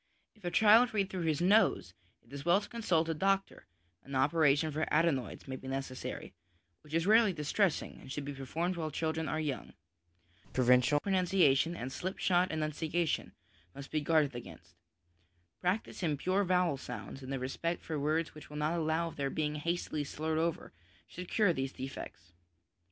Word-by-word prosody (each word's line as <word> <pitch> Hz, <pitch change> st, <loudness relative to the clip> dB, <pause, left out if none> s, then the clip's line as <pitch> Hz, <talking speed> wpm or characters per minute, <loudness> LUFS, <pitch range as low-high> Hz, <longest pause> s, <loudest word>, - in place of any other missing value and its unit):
If 215 Hz, -, -25 dB
a 175 Hz, -, -1 dB
child 220 Hz, +4 st, +5 dB
read 195 Hz, -2 st, 0 dB
through 180 Hz, -3 st, -3 dB
his 155 Hz, -1 st, +1 dB
nose, 185 Hz, -, +3 dB, 0.3 s
it 115 Hz, +4 st, -19 dB
is 140 Hz, -1 st, -6 dB
well 175 Hz, +3 st, +4 dB
to 205 Hz, -, -9 dB
consult 180 Hz, -9 st, 0 dB
a 165 Hz, -, 0 dB
doctor; 195 Hz, +4 st, 0 dB, 0.4 s
an 140 Hz, -, -7 dB
operation 145 Hz, +2 st, +3 dB
for 155 Hz, +2 st, -2 dB
adenoids 155 Hz, -8 st, +1 dB
may 130 Hz, 0 st, -4 dB
be 130 Hz, -, -10 dB
necessary, 135 Hz, -1 st, -5 dB, 0.5 s
which 150 Hz, +1 st, -7 dB
is 165 Hz, 0 st, +1 dB
rarely 215 Hz, -1 st, +5 dB
distressing, 160 Hz, +3 st, 0 dB
and 130 Hz, -, -10 dB
should 145 Hz, 0 st, -4 dB
be 145 Hz, -, -4 dB
performed 165 Hz, +7 st, -3 dB
while 160 Hz, -2 st, -2 dB
children 160 Hz, +1 st, -2 dB
are 155 Hz, -, -1 dB
young. 150 Hz, -4 st, -3 dB, 0.8 s
Provincial 125 Hz, +3 st, +4 dB
pronunciation 180 Hz, -4 st, +2 dB
and 130 Hz, -4 st, -5 dB
slipshod 180 Hz, +2 st, 0 dB
enunciation 160 Hz, +1 st, -1 dB, 0.4 s
must 140 Hz, -1 st, -9 dB
be 155 Hz, -, 0 dB
guarded 150 Hz, -2 st, +2 dB
against. 120 Hz, -, -10 dB, 0.9 s
Practice 185 Hz, +4 st, -2 dB
in 155 Hz, -5 st, 0 dB
pure 185 Hz, +6 st, +1 dB
vowel 180 Hz, -5 st, +2 dB
sounds, 135 Hz, 0 st, -7 dB
and 130 Hz, 0 st, -7 dB
the 135 Hz, -, -1 dB
respect 135 Hz, +7 st, -3 dB
for 155 Hz, -2 st, -3 dB
words 155 Hz, +3 st, 0 dB
which 155 Hz, -1 st, -12 dB
will 150 Hz, -, -7 dB
not 150 Hz, +2 st, 0 dB
allow 160 Hz, +1 st, 0 dB
of -, -, -13 dB
their 140 Hz, -1 st, -1 dB
being 150 Hz, +1 st, -1 dB
hastily 155 Hz, 0 st, -2 dB
slurred 155 Hz, +2 st, -2 dB
over, 165 Hz, 0 st, -2 dB, 0.3 s
should 180 Hz, 0 st, -9 dB
cure 205 Hz, -5 st, +3 dB
these 135 Hz, -2 st, -3 dB
defects. 130 Hz, -9 st, -8 dB
160 Hz, 175 wpm, -32 LUFS, 140-180 Hz, 0.9 s, child